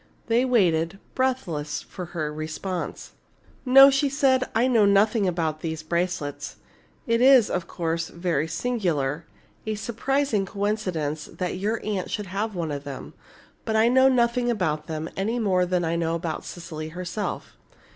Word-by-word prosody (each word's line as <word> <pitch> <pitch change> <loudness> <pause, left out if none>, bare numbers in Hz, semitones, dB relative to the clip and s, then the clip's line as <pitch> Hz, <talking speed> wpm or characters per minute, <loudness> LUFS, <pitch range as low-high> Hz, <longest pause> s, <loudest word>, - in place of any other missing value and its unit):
They 235 +2 +2
waited, 180 -8 +2 0.2
breathless, 215 - -1
for 180 - -8
her 155 -3 -4
response. 160 +4 -5 0.6
"No," 270 +2 +9
she 275 +1 +2
said, 265 -2 +3
"I 230 +2 +3
know 235 -4 +4
nothing 205 +1 +3
about 160 -3 -1
these 160 -1 -4
bracelets. 170 -3 -2 0.5
It 230 +1 +1
is, 260 -3 +6
of 175 -2 -2
course, 165 -1 -2
very 170 -3 -1
singular 165 - -1 0.4
a 215 - -1
surprising 235 0 -1
coincidence 185 -8 -2
that 180 0 -4
your 215 +4 -1
aunt 205 -3 -2
should 210 - -3
have 200 +3 -3
one 165 -3 -2
of 140 -1 -4
them. 140 -2 -8 0.5
But 220 - -2
I 220 +2 +5
know 260 +1 +5
nothing 245 -1 +2
about 155 -9 -1
them, 160 0 -4
any 215 +5 -1
more 185 -5 +2
than 180 -1 0
I 165 +1 0
know 165 0 0
about 165 -1 -4
Cecily 160 -2 -7
herself." 180 +5 -5
185 Hz, 155 wpm, -25 LUFS, 165-230 Hz, 0.6 s, No